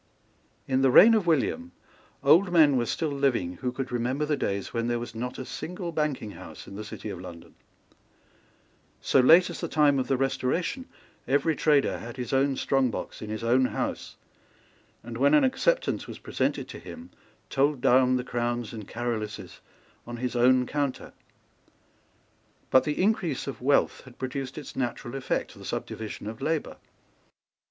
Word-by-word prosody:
In 130 0 +1
the 135 - +4
reign 220 - +8
of 210 -5 +1
William 245 - 0 0.5
old 180 +3 +5
men 155 -5 +5
were 120 -2 +1
still 160 +4 -1
living 120 -11 0
who 125 - -2
could 130 0 -5
remember 125 +5 -1
the 150 0 0
days 100 -7 -3
when 115 0 -1
there 120 0 0
was 120 0 -6
not 125 +2 -5
a 130 - -6
single 175 +7 -5
banking 150 -9 -2
house - - -11
in - - -10
the 105 - -6
city 105 0 -7
of 90 - -7
London. 85 -2 -11 1.5
So - - +2
late 170 +8 +6
as - - -7
the - - -2
time 145 -3 +3
of 130 - -2
the 135 - +1
Restoration 135 - -1 0.4
every 145 +4 +2
trader 145 -2 +2
had 120 +2 -9
his 125 -1 -4
own 135 +1 +2
strong 135 -1 +1
box - - -6
in 110 - -6
his 110 +1 -4
own 125 +3 +3
house, - - -3 0.9
and, 115 0 -7
when 140 +3 +5
an - - +5
acceptance - - +1
was - - -8
presented - - -2
to - - -8
him, 250 +2 -11 0.4
told 140 0 +2
down 130 +1 +4
the 125 - -1
crowns 120 -1 -2
and 110 -3 -8
Caroluses 115 -3 -4 0.5
on 120 0 -6
his 125 +1 -3
own 125 +1 +4
counter. 140 -1 -3 1.6
But 130 0 +5
the 150 - -2
increase 185 -8 0
of 140 - -6
wealth 140 +3 +2
had 130 -2 -15
produced 130 +1 -5
its 150 - -8
natural 120 -1 -3
effect, 135 -1 -2
the - - -13
subdivision 110 -2 -5
of 110 +1 -7
labour. 160 -1 -2
130 Hz, 170 wpm, -27 LUFS, 120-150 Hz, 1.6 s, reign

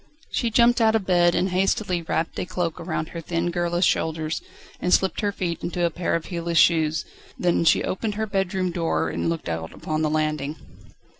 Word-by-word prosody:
She 235 - 0
jumped 235 +1 +4
out 220 0 +4
of 215 -4 0
bed 175 -2 +4
and 185 - +1
hastily 185 -1 +1
wrapped 165 0 -2
a - - -2
cloak 170 -3 -2
round 160 -1 -3
her 170 - -6
thin 170 +1 -1
girlish 175 +1 +1
shoulders, 160 -1 0 0.4
and 180 - -1
slipped 190 +4 +3
her 205 -1 +1
feet 175 -4 -3
into 175 0 -1
a 170 - +1
pair 175 +1 -1
of 165 - -2
heelless 170 -2 -2
shoes, 160 -3 +3 0.3
then 175 -1 +2
she - - +4
opened 210 +2 -2
her 220 +1 -1
bedroom 190 -2 -1
door 170 -1 0
and - - -1
looked 165 -1 -3
out 80 -1 -3
upon 155 0 -3
the 155 - +1
landing. 155 -1 -1
175 Hz, 200 wpm, -24 LUFS, 160-185 Hz, 0.4 s, jumped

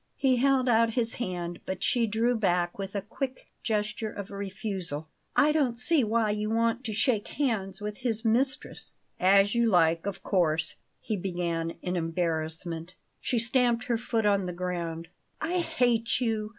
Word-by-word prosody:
He 260 -2 +3
held 265 0 +3
out 230 -1 +3
his 235 -2 0
hand, 175 -5 -3
but 190 0 -3
she 235 -2 +2
drew 230 +3 +1
back 180 -4 +1
with 195 +1 -5
a 200 - -1
quick 260 +5 -5
gesture 215 0 -1
of 200 -1 -7
refusal. 190 -6 -4 0.3
"I 295 +1 +5
don't 275 -6 +1
see 290 +3 +3
why 220 -1 +2
you 210 0 -1
want 230 +2 +1
to 225 - -2
shake 220 0 +1
hands 215 -9 -1
with 210 0 -5
his 230 -2 -2
mistress." 260 +5 0 0.3
"As 195 +2 +5
you 235 -1 +3
like, 165 -1 +3
of 200 - -4
course," 165 -4 +1 0.3
he 215 - -2
began 170 -3 -2
in 180 0 -1
embarrassment. 165 0 -2 0.2
She 245 - -1
stamped 240 +1 +2
her 235 -2 0
foot 225 -2 -1
on 200 -2 +3
the 180 - -3
ground. 170 -2 -3 0.3
"I 355 +3 0
hate 245 -9 +1
you!" 220 -4 -1
210 Hz, 165 wpm, -28 LUFS, 180-235 Hz, 0.3 s, I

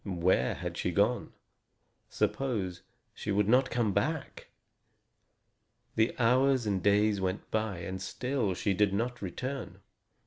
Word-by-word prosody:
Where 90 -8 +1
had - - -5
she - - -1
gone? - - +1 0.8
Suppose 100 -10 -1 0.3
she - - -7
should 100 0 +2
not 125 +3 +4
come 115 -5 0
back! 155 +10 -2 1.5
The 110 +2 +2
hours 130 +1 +3
and 100 -3 0
days 105 +1 +3
went 95 +1 -3
by, 110 -4 -1
and 95 +2 -5
still 125 -4 -1
she 100 +1 0
did 100 0 +2
not 120 +3 -2
return. 125 +7 -5
105 Hz, 130 wpm, -30 LUFS, 95-125 Hz, 1.5 s, not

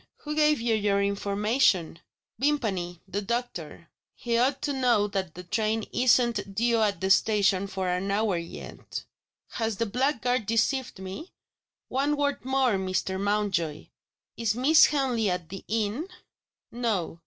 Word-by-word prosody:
"Who 300 - -4
gave 300 -1 +3
you 230 0 +1
your 205 -2 +2
information?" 200 -3 +1 0.4
"Vimpany 205 - -1
the 200 +2 -3
doctor." 195 -9 -4 0.3
"He 235 -1 -2
ought 260 +4 +2
to 290 - 0
know 245 -6 +3
that 190 -5 -3
the 180 - -8
train 215 +4 0
isn't 235 -5 +2
due 230 +1 +2
at 205 -4 +1
the 190 +2 0
station 200 -2 +3
for 190 -1 -3
an 180 +2 -1
hour 205 -1 +1
yet." 170 0 -7 0.5
"Has 225 -3 -2
the 230 - 0
blackguard 250 -1 0
deceived 245 +3 0
me? 190 - -8 0.6
One 285 +3 0
word 285 -3 -1
more, 260 -4 +2
Mr. 190 0 -2
Mountjoy. 200 -7 -1 0.5
Is 225 -2 0
Miss 290 +6 +6
Henley 255 -7 0
at 180 -3 -3
the 195 0 -8
inn?" 225 - -1 0.6
"No." 215 -9 -2
215 Hz, 140 wpm, -27 LUFS, 195-250 Hz, 0.6 s, Miss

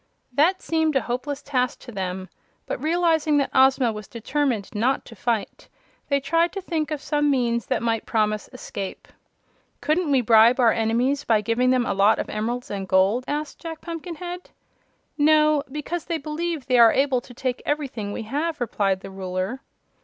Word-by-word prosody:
That 335 +8 +2
seemed 320 -2 +1
a 265 - +3
hopeless 275 +4 -4
task 255 -3 0
to 245 - -10
them, 190 -2 -4 0.4
but - - -4
realizing 320 -2 +2
that 280 - 0
Ozma 265 -2 +4
was 210 -1 -8
determined 245 -2 -2
not 245 +6 0
to 230 - -12
fight, 225 0 -3 0.4
they 280 -1 +3
tried 330 +5 +1
to 395 - -3
think 320 -5 -2
of 305 -2 -3
some 295 -1 +1
means 235 -5 0
that - - -1
might 225 -1 -1
promise 215 -1 0
escape. 200 -6 -7 0.7
"Couldn't 320 +1 0
we 270 -3 +4
bribe 230 +2 +5
our 235 -3 +5
enemies, 240 +6 +1
by 220 -2 +2
giving 230 +4 +1
them 255 -1 +2
a - - 0
lot 200 +2 +4
of - - -4
emeralds 235 +4 -3
and 195 -2 -4
gold?" 195 +7 +3
asked 295 0 -4
Jack 325 -2 -7
Pumpkinhead. 350 +1 -7 0.7
"No, 305 0 +4
because 300 +3 -4
they 335 -2 -1
believe 310 -1 -4
they 255 -2 +3
are 230 -1 +8
able 270 -2 +2
to 245 - -14
take 255 0 -2
everything 265 -9 -3
we 225 - -4
have," 295 +8 -2
replied 200 -5 0
the 195 - -9
Ruler. 190 +6 -4
255 Hz, 175 wpm, -24 LUFS, 225-305 Hz, 0.7 s, are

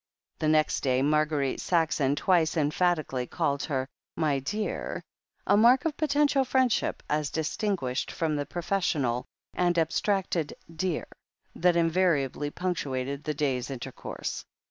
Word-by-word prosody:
The 155 - 0
next 155 0 +3
day 130 -1 +2
Marguerite 150 -2 +1
Saxon 160 -5 +1
twice 165 0 +2
emphatically 150 -4 +1
called 140 +3 -1
her 130 -3 -1 0.3
"my 150 -4 +1
dear" 210 +11 -3 0.2
— - - -45
a 200 - +4
mark 240 +6 +5
of 315 -3 0
potential 290 -2 +2
friendship 255 -3 +1
as 150 -1 0
distinguished 160 -4 -1
from 160 -2 -1
the 145 -1 -2
professional 155 -8 -1 0.3
and 175 -1 +1
abstracted 170 0 0 0.2
"dear," 175 0 -1 0.5
that 175 0 +3
invariably 165 -5 +1
punctuated 140 -6 -3
the 150 -1 -1
day's 135 -4 -1
inter 130 -3 -5
course. - - -5
155 Hz, 130 wpm, -28 LUFS, 140-185 Hz, 0.5 s, mark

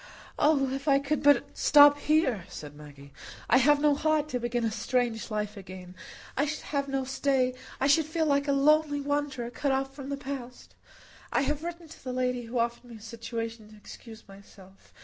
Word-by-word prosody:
"Oh, 290 -2 +3
if 275 +2 -5
I 275 -1 +5
could 280 +2 -1
but 290 0 +4
stop 290 0 +6
here!" 285 - +1
said 145 -1 -9
Maggie. 145 -2 -14 0.3
"I 245 - +5
have 290 +3 +4
no 295 0 +3
heart 305 +1 0
to 250 - -2
begin 240 0 -2
a 225 - 0
strange 235 +1 -1
life 210 -1 -3
again. 185 -2 -10 0.4
I 285 - +1
should 310 - -4
have 280 -1 -2
no 270 -1 -1
stay. 265 -1 0 0.3
I 265 - +1
should 290 +2 +3
feel 320 0 -1
like 280 -1 +1
a - - +2
lonely 290 +1 +3
wanderer, 285 -4 -2
cut 280 +3 -1
off 270 0 -1
from 275 -1 -8
the 280 - -3
past. 265 -3 -8 0.6
I - - +2
have 290 +2 -2
written 340 -1 -6
to 315 - -15
the 255 -1 -4
lady 250 -1 -1
who 235 +2 -5
offered 235 +1 -1
me 240 -1 -12
a - - -11
situation 230 0 -6
to 215 - -15
excuse 225 +1 -13
myself. 195 -1 -17
265 Hz, 200 wpm, -28 LUFS, 230-290 Hz, 0.6 s, stop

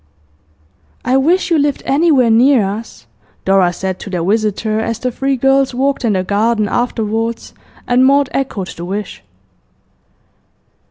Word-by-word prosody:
'I 255 +1 +2
wish 345 +7 +1
you 325 - +3
lived 290 -1 -1
anywhere 275 -5 +3
near 245 0 +4
us,' 210 - -7 0.4
Dora 190 -2 +3
said 185 +1 -4
to - - -8
their 180 -3 -2
visitor, 215 +1 0
as 225 0 -2
the 250 +2 -3
three 270 +3 -1
girls 270 0 +1
walked 275 +2 0
in 225 -3 +1
the 185 -1 0
garden 215 +2 0
afterwards, 225 0 -2 0.3
and 245 +1 +3
Maud 280 +1 +4
echoed 225 -9 -3
the 170 - -8
wish. 200 +4 -5
230 Hz, 145 wpm, -15 LUFS, 205-270 Hz, 0.4 s, near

